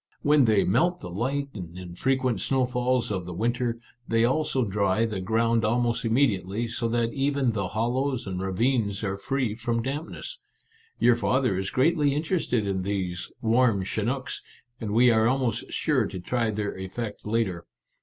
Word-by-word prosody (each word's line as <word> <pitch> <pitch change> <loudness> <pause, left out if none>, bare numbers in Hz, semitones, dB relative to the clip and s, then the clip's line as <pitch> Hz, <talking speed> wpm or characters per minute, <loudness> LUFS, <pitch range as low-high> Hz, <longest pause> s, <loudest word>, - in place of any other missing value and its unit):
When 145 -2 +5
they 110 -3 +4
melt 175 - +2
the 90 - -7
light 135 +9 -1
and 90 -4 -8
infre 95 +9 -1
quent 125 -6 0
snowfalls 125 -1 +1
of 90 -3 -3
the 90 - -6
winter, 120 +3 -1 0.3
they 115 0 +3
also 130 -1 +1
dry 100 +1 +1
the 105 -4 -3
ground 115 +3 +1
almost 120 +2 +1
immediately, 115 -3 +1
so 115 0 -2
that 115 0 0
even 140 -2 +1
the 100 -4 -2
hollows 120 +6 -1
and 95 -2 -4
ravines 105 +2 0
are 95 -2 -1
free 125 +3 -1
from 115 +1 -2
dampness. 155 - -5 0.6
Your 120 -1 +5
father 125 -2 +1
is 95 +1 -2
greatly 145 +1 +2
interested 150 - 0
in 95 -1 -1
these 95 -2 -3
i - - -14
warm 115 -3 +3
chinooks/ 120 +7 -2 0.4
and 110 - -4
we 120 +4 +5
are 110 0 +4
almost 120 -3 0
sure 130 -9 +1
to 95 - -6
try 115 +5 0
their 105 -1 -2
effect 100 +3 -5
later. 105 -6 -1
115 Hz, 165 wpm, -26 LUFS, 100-130 Hz, 0.6 s, When